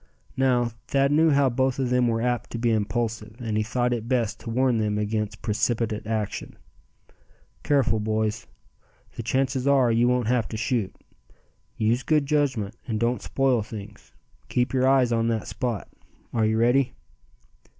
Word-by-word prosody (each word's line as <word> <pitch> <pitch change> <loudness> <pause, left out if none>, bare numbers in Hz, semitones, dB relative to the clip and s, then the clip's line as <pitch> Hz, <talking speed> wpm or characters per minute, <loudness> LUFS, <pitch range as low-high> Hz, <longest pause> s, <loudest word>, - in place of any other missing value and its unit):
Now, 125 -3 +2 0.2
Thad 140 0 +2
knew 160 +2 +4
how 140 -2 +4
both 130 +1 0
of 130 -2 -1
them 125 -1 +3
were 115 0 0
apt 120 -1 -1
to - - -2
be 115 0 +1
impulsive, 110 0 -2
and 115 -3 -3
he 110 - +2
thought 120 +3 0
it 115 -1 -4
best 120 -3 0
to - - -8
warn 125 0 +2
them 105 -1 0
against 105 0 -2
precipitate 110 0 -1
action. 110 -2 -3 1.0
"Careful, 130 -7 +2
boys. 110 +1 -1 0.7
The - - -4
chances 130 +2 0
are, 135 -4 +4
you 115 +1 +3
won't 125 -1 +1
have 115 -2 +1
to 110 - -5
shoot. 115 -4 -1 0.8
Use 115 +3 +1
good 150 +1 +2
judgment, 135 -8 0
and 110 -3 -2
don't 120 +2 0
spoil 135 -4 +1
things. 105 -1 -10 0.4
Keep 125 +2 0
your 130 0 +2
eyes 130 -3 +4
on 115 0 +1
that 115 -2 -1
spot. 120 -7 -3 0.5
Are 110 -2 +2
you 110 0 +1
ready?" 120 +2 +2
120 Hz, 165 wpm, -25 LUFS, 110-130 Hz, 1.0 s, knew